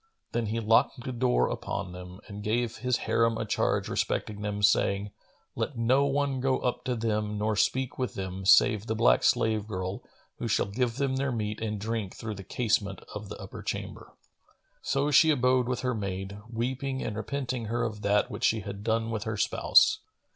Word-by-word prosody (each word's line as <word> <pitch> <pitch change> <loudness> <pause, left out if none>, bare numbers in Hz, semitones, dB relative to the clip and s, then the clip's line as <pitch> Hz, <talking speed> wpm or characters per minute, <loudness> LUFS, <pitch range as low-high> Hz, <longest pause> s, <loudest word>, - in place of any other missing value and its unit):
Then 115 -2 -1
he 115 +2 -1
locked 115 +3 +2
the 130 - -4
door 125 0 +2
upon 90 - -4
them 90 +1 -10
and 105 0 -7
gave 115 +2 -1
his 125 +1 0
Harim 115 -1 +2
a 110 - -2
charge 105 - 0
respecting 105 -1 -2
them, 105 0 -3
saying, 100 0 +2 0.4
"Let 140 - -3
none 135 +3 +2
go 130 0 +2
up 125 - -2
to 125 - 0
them 105 -2 -1
nor 105 +1 0
speak 130 +5 0
with 125 - -2
them, 95 0 -5
save 105 +3 +5
the 110 - -1
black - - +4
slave 110 -2 +2
girl 95 -2 -4 0.4
who 115 - -2
shall 110 - +2
give 115 +3 -1
them 135 -1 0
their 135 0 0
meat 110 -2 -3
and 105 -2 -2
drink 110 -2 -3
through 110 -1 -5
the 100 -1 -8
casement 100 -3 -1
of 105 -1 -7
the - - -7
upper 95 - -9
chamber." - - -5 0.7
So 140 +2 0
she 160 +3 +6
abode 125 -3 +3
with 125 - -1
her 125 -1 0
maid, 100 -1 -4
weeping 130 +3 -2
and 110 - -3
repenting 125 +1 -3
her 115 +3 -1
of 105 -2 -3
that 105 0 +2
which - - -2
she 110 -1 +2
had 100 0 -7
done 115 +1 0
with 110 -2 -3
her 110 0 -2
spouse. 430 - +4
110 Hz, 190 wpm, -28 LUFS, 105-125 Hz, 0.7 s, she